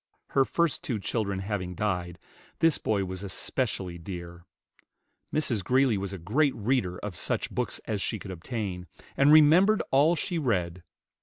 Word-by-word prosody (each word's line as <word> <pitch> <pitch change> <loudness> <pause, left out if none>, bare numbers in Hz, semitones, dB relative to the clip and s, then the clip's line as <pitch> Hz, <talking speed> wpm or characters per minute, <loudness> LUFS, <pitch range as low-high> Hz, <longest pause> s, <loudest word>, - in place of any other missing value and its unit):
Her 135 - +3
first 170 0 0
two 140 -11 -2
children 100 -1 -2
having 95 -3 -3
died, 90 -3 -2 0.4
this 165 -2 +3
boy 100 -3 0
was 95 0 -6
especially 95 -2 -3
dear. 85 0 -8 0.9
Mrs. 120 -10 0
Greeley 130 +2 +3
was 100 -1 -3
a 95 - -5
great 130 - +1
reader 105 -5 0
of 105 -2 -6
such - - -1
books - - -2
as 105 -2 -2
she 110 - -2
could 95 -1 -8
obtain, 90 -1 -5 0.3
and 140 +2 +5
remembered 165 +8 +6
all 150 +6 +4
she 175 +2 -2
read. 90 - -1
105 Hz, 155 wpm, -28 LUFS, 90-135 Hz, 0.9 s, remembered